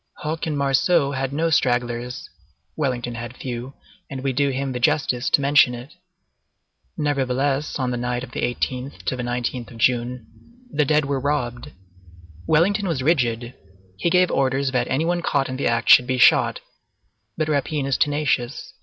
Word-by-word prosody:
Hoche 160 +2 -3
and 150 -2 -2
Marceau 140 +2 +2
had 135 -1 -2
no 165 +3 0
stragglers; 120 -3 0 0.5
Wellington 125 -5 -2
had 120 +1 -7
few, 125 +1 -6 0.3
and 135 -1 -6
we 135 -1 0
do 140 +2 +1
him 135 0 -2
the 125 - -4
justice 135 -3 +1
to - - +3
mention 140 -3 +4
it. 120 +4 -10 1.0
Nevertheless, 140 0 0
on 130 -2 -1
the 125 - -2
night 125 0 -2
from 125 - -9
the - - -4
18th 125 +2 -3
to - - -1
the 125 - -4
19th 120 0 -3
of 115 - -12
June, 120 0 0 0.5
the 150 0 +1
dead 150 +1 +2
were 140 -1 -1
robbed. 125 -4 -2 0.8
Wellington 195 +6 +2
was 150 -7 -1
rigid; 120 -6 0 0.4
he 135 - 0
gave 180 +1 +3
orders 135 0 +1
that 125 -2 0
any 140 +5 0
one 175 +1 0
caught 140 -4 0
in 130 - -4
the 140 - 0
act 115 -1 0
should 125 - +7
be 130 0 0
shot; 120 - +4 0.8
but 155 - 0
rapine 145 -1 -1
is 135 -1 0
tenacious. 145 -3 -1
135 Hz, 170 wpm, -22 LUFS, 125-145 Hz, 1.0 s, should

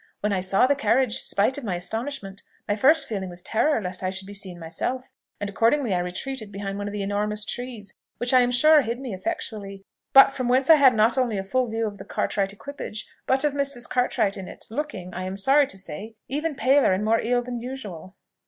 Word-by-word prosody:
When 210 0 0
I 190 - +1
saw 190 +5 +3
the 275 - +3
carriage, 260 -3 +1
spite 230 +8 +1
of - - -11
my 195 -6 -2
astonishment, 210 +2 -5 0.3
my 205 - +1
first 285 +9 +4
feeling 195 -4 -4
was 175 0 -8
terror 290 +5 +2
lest 185 -2 -5
I 185 - -1
should 190 0 -5
be 200 - -9
seen 190 -3 -4
myself; 175 +10 -4 0.3
and 205 - -3
accordingly 230 +3 +2
I 180 - +1
retreated 210 +6 -4
behind 200 0 -5
one 205 - -3
of - - -4
the 205 -1 -3
enormous 210 +1 -1
trees, 245 -4 -6 0.2
which 245 +2 0
I 255 - +7
am 245 - +2
sure 300 +5 +6
hid 235 -1 -3
me 260 -5 -5
effectually, 200 - -5 0.3
but 270 -1 +8
from 255 -2 -3
whence 260 +4 +4
I - - +10
had 265 -4 +6
not 225 +3 +3
only 240 -5 0
a 190 - -2
full 255 +6 0
view 225 0 -1
of 205 -2 -5
the - - -9
Cartwright 195 -1 -1
equipage, 215 -1 -7 0.2
but 265 +2 +2
of 295 -2 +1
Mrs. 280 -4 -1
Cartwright 230 -5 0
in 190 -1 -7
it, - - -9
looking, 225 -10 -5
I 185 +1 -4
am 190 +1 -4
sorry 275 +7 +4
to 195 - -7
say, 195 +5 -6
even 300 +3 -2
paler 265 -3 +4
and 195 +3 -1
more 225 +1 +3
ill 245 +1 +1
than 245 -1 -5
usual." 205 -8 -8
220 Hz, 225 wpm, -25 LUFS, 195-260 Hz, 0.3 s, I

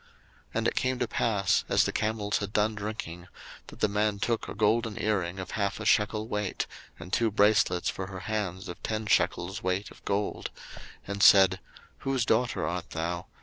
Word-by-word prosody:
01:024:022 - - -27 0.5
And - - +1
it - - -1
came 130 0 0
to 125 - -1
pass, 100 -5 +1
as - - +4
the - - 0
camels 105 -1 -1
had 105 -1 -4
done 105 +1 +2
drinking, 100 -5 -6 0.4
that - - -13
the - - +4
man 105 0 0
took 115 +2 -1
a - - -6
golden 110 +1 +1
earring 95 -4 0
of 95 -1 -6
half 100 -1 -1
a 110 - -5
shekel 110 0 +2
weight, 105 -3 -2 0.3
and 90 +2 -11
two 115 -1 +3
bracelets 105 -4 +3
for 95 - -3
her 95 -1 -7
hands 100 -2 -3
of 90 - -8
ten 110 0 -2
shekels 95 -1 +1
weight 95 +2 -1
of - - -16
gold; 100 +1 -2
01:024:023 - - -13 0.3
And 100 0 -3
said, 95 -2 +7 0.4
Whose 135 -3 0
daughter 120 -11 +1
art 85 +1 -4
thou? 85 +2 -3
105 Hz, 190 wpm, -28 LUFS, 95-110 Hz, 0.5 s, said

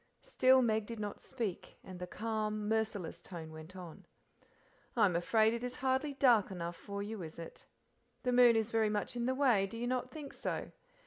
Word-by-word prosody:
Still 260 0 +4
Meg 220 -2 +1
did 230 -2 -6
not 205 -1 -5
speak, 225 -9 -5
and 185 -1 -9
the 180 - -5
calm, 215 0 -2
merciless 220 -5 -1
voice 170 -4 -8
went 160 +3 -11
on. 175 -3 -10 0.9
"I 225 - +6
am 180 -4 +1
afraid 220 +6 +3
it 235 +1 -4
is 250 0 -4
hardly 265 +2 0
dark 240 -7 +5
enough 175 -2 -4
for 200 +4 -5
you, 210 -1 -5
is 160 -2 -8
it? 165 0 -10 0.6
The 250 - +1
moon 245 -1 +7
is 225 0 0
very 225 -1 +2
much 210 +2 -2
in 240 0 -1
the 260 - +1
way, 245 -8 +3
do 230 - -8
you 235 - -2
not 255 0 -1
think 290 +1 -8
so? - - -4
220 Hz, 200 wpm, -34 LUFS, 190-245 Hz, 0.9 s, moon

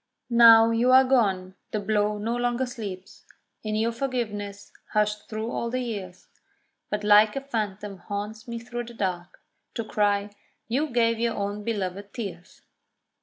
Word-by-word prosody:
Now 230 -1 +8
you 235 +2 +3
are 260 +1 +8
gone 195 -8 +1 0.2
the 215 - -2
blow 210 0 0
no 225 +3 -2
longer 245 +1 0
sleeps 200 -7 -8 0.4
In 215 -1 -3
your 225 +2 +1
forgiveness 215 -5 -4 0.2
hushed 210 0 0
through 220 +1 -4
all 235 - -2
the 255 +2 -1
years; 200 -7 -6 0.6
But 210 0 -2
like 210 +2 +6
a 275 - -2
phantom 210 -6 -4
haunts 210 +4 -6
me 235 0 -4
through 240 +1 -5
the 235 0 -11
dark, 185 -3 -4 0.3
To 230 - -2
cry 205 -1 0 0.4
"You 270 +7 0
gave 230 -2 +2
your 235 -1 0
own 205 +1 -3
belovèd 200 -2 -3
tears." 190 -6 -8
215 Hz, 155 wpm, -26 LUFS, 205-235 Hz, 0.6 s, Now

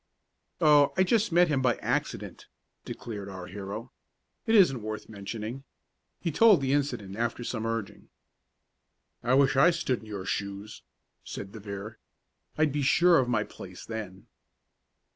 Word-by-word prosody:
"Oh, 145 -3 +5
I 185 - +5
just 210 +1 +2
met 175 +1 +5
him 145 -4 +1
by 125 -2 +2
accident," - - -3 0.4
declared 105 -4 -7
our 95 -2 -7
hero. 100 +6 -7 0.6
"It 225 - +3
isn't 155 - +5
worth 110 0 -5
mentioning." 110 +5 -6 0.6
He 170 - -2
told 215 +3 +6
the 135 0 0
incident 120 -9 -1
after 120 +1 -2
some 115 -1 -3
urging. 115 -3 -5 1.1
"I 125 +2 +2
wish 135 0 +4
I 135 +6 +6
stood 165 -8 -1
in 110 - -14
your 100 -3 -6
shoes," 100 +2 -4 0.4
said 95 - -7
De 110 - -9
Vere. 100 +2 -7 0.6
"I'd 155 -1 +3
be 145 +1 -1
sure 170 +5 +5
of 125 -2 0
my 110 -3 +1
place 90 -3 -11
then." 105 -4 -7
120 Hz, 150 wpm, -28 LUFS, 105-145 Hz, 1.1 s, told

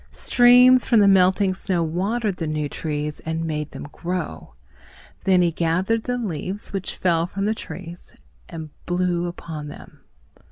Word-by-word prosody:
Streams 250 +1 +6
from 235 - +3
the 205 - +5
melting 190 0 +4
snow 185 -2 -1
watered 195 +5 -1
the 165 - -3
new 155 -1 -1
trees 150 0 -4
and 160 +1 -3
made 150 -2 -3
them - - -9
grow. 180 +1 -5 0.7
Then 185 -2 +4
he 170 - +2
gathered 180 +8 0
the 245 0 -1
leaves 195 -2 -5
which 195 -1 -4
fell 170 -2 +1
from 195 +2 -3
the 215 - +1
trees 175 -5 -9 0.4
and 160 -3 -8 0.2
blew 175 -1 0
upon 160 -3 -7
them. 145 - -12
180 Hz, 155 wpm, -23 LUFS, 165-200 Hz, 0.7 s, Streams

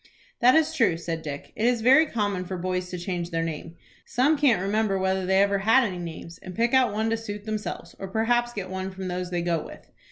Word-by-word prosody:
"That 250 +3 +6
is 320 0 +3
true," 230 - +2
said 165 -1 -4
Dick. 145 -2 -7
"It 225 - +1
is 245 -2 +1
very 270 +7 +6
common 205 -7 -1
for 185 +1 -5
boys 180 0 -2
to 180 - -5
change 175 -1 -3
their 165 -1 -1
name. 165 +1 -5 0.3
Some 270 +6 +2
can't 280 -8 +3
remember 200 +1 0
whether 190 0 0
they 190 +1 +4
ever 200 0 +1
had 225 +7 +4
any 190 -6 -3
names, 170 0 -8
and 185 -1 -9
pick 235 +2 +1
one 220 -5 +3
out - - +1
to 225 - +1
suit 210 -2 -7
themselves, 215 -1 -5
or 195 - -5
perhaps 240 +4 +1
get 195 -5 -6
one 190 0 -3
from 190 -1 -6
those 180 0 -3
they 175 -1 -2
go 170 -3 0
with. - - -13
195 Hz, 235 wpm, -26 LUFS, 180-225 Hz, 0.3 s, That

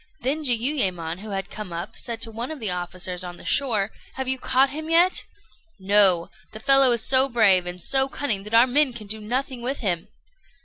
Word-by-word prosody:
Then 290 +5 -1
Jiuyémon, 220 - -1
who 215 +2 -9
had 195 -1 -5
come 210 -4 -8
up, 170 +2 -7
said 230 -1 -4
to 225 - -5
one 230 +3 -6
of 315 -2 -7
the 215 -5 -2
officers 180 0 -4
on 175 -1 -8
the - - -14
shore 220 -7 0 0.2
"Have 265 -1 -4
you 260 0 -1
caught 265 +2 +1
him 310 +2 -7
yet?" 345 +3 +3 0.5
"No; 190 -3 +3 0.2
the 220 - -8
fellow 270 +2 +6
is 235 -2 +2
so 265 +1 +6
brave 200 -7 +3
and 180 0 -6
so 265 +8 +2
cunning 235 -9 -3
that 215 +2 -3
our 230 +2 +7
men 265 +1 +1
can 225 -3 -9
do 215 +2 -1
nothing 250 +3 -4
with 265 +4 -3
him." 175 -6 -2
225 Hz, 210 wpm, -23 LUFS, 190-265 Hz, 0.5 s, our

